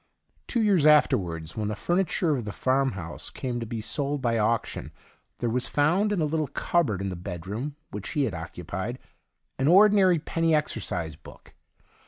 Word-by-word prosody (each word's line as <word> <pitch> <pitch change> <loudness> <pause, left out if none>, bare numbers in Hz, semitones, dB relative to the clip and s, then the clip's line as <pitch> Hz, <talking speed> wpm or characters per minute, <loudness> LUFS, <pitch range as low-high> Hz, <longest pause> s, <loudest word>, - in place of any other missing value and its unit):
Two 235 -3 +1
years 195 -7 +3
afterwards, 85 - +3
when 105 -2 -2
the 105 - -2
furniture 175 - +1
of 125 - -3
the 105 - -5
farmhouse 130 -10 -1
came 125 -2 -4
to 115 - -5
be 115 0 -4
sold 140 +5 -1
by 120 -3 0
auction, 115 +2 -1 0.5
there 120 - -2
was 125 +2 0
found 175 +9 +2
in 205 - 0
a 155 - +2
little 155 0 -1
cupboard 135 - 0
in 100 - -2
the 90 - -4
bedroom 95 - -5 0.2
which 105 0 -6
he 145 - +1
had 115 - -1
occupied 90 +7 -5 0.6
an 135 - +2
ordinary 190 0 +6
penny 165 +1 +1
exercise 90 - -2
book. - - -15
130 Hz, 170 wpm, -26 LUFS, 100-160 Hz, 0.6 s, ordinary